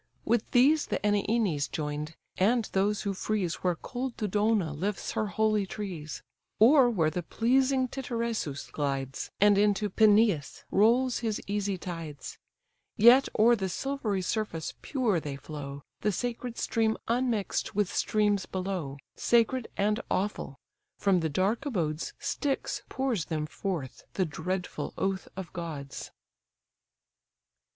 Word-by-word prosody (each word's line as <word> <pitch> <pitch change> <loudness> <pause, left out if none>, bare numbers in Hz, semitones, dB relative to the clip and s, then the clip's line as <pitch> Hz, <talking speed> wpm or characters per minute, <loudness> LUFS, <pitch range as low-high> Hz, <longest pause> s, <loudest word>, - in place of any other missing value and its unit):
With 230 0 +1
these 285 +5 +4
the - - 0
Enians 205 -7 +1
join'd, 150 +1 -4 0.2
and 225 +4 +2
those 200 +1 +1
who 200 -2 -1
freeze 190 -3 -1
Where 180 -2 0
cold 250 +7 -5
Dodona 210 -5 +1
lifts 195 +7 -3
her 215 - -1
holy 215 -1 +1
trees; 170 -10 -6 0.3
Or 250 +3 +7
where 165 -9 +1
the 180 - -2
pleasing 260 +7 +2
Titaresius 235 - -3
glides, 135 -2 -2
And 205 0 +5
into 205 0 +2
Peneus 210 - +3
rolls 240 +5 +3
his 220 -3 -1
easy 200 -1 -1
tides; 165 -5 -7 0.6
Yet 245 +5 +7
o'er 235 +3 +6
the 190 -4 -2
silvery 220 -4 -2
surface 180 -6 -2
pure 240 - +1
they 145 -3 -5
flow, 140 -1 -7 0.2
The 210 - +1
sacred 240 +3 -3
stream 220 -1 +1
unmix'd 235 -3 0
with 205 -2 0
streams 205 -2 +1
below, 185 -7 -3 0.2
Sacred 235 +1 +2
and 210 +2 +2
awful! 190 -8 -2 0.4
from 195 -2 +3
the 160 -1 -1
dark 190 +9 0
abodes 165 - -2
Styx 290 - -2
pours 255 - -1
them 155 -3 -2
forth, 155 - -5
the 190 - +1
dreadful 180 +4 -4
oath 195 0 -1
of 190 -3 -6
gods! 155 -6 -6
205 Hz, 130 wpm, -29 LUFS, 165-230 Hz, 0.6 s, Or